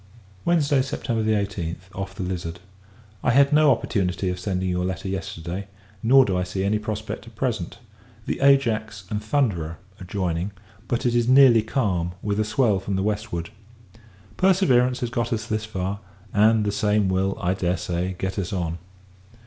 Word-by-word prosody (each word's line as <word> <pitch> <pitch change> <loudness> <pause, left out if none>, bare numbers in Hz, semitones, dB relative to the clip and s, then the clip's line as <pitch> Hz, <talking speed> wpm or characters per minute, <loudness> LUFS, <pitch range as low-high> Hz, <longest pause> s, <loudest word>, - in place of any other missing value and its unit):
Wednesday, 145 -5 +3
September 130 -4 -2
18th, 95 -4 -2
off 95 0 -5
the 95 - -4
Lizard. 90 -1 -4 0.6
I - - +2
had 140 +4 +5
no 150 0 +6
opportunity 95 -6 0
of 90 - -5
sending 95 -1 -2
your 90 0 0
letter 95 +1 -3
yesterday, 95 -1 -4 0.3
nor 130 +3 +6
do 95 - -1
I 90 - +1
see 95 +1 -3
any 105 +2 +1
prospect 110 +1 -5
at 115 - -14
present. 110 -7 -2 0.5
The - - -2
Ajax 115 -7 +2
and 105 0 -2
Thunderer 105 - 0 0.2
are - - -7
joining; 90 0 -2 0.3
but, 120 +1 -1
it 120 - +2
is 120 -1 +2
nearly 130 -4 +7
calm, 95 -7 -1
with 105 0 -1
a - - +3
swell 105 -2 +2
from 95 +1 -3
the 95 - 0
westward. 105 -4 -3 0.9
Perseverance 130 -10 +3
has 120 -1 -2
got 120 +1 -1
us 115 -1 -1
thus 110 -2 -2
far; 95 -1 -3 0.3
and 110 +1 +4
the 105 - +1
same 105 -1 +2
will, 95 +1 0
I 90 +2 +1
dare 90 -1 0
say, 90 +3 -2
get 95 +2 -3
us 90 -3 -3
on. 85 -3 -2
105 Hz, 175 wpm, -24 LUFS, 95-115 Hz, 0.9 s, nearly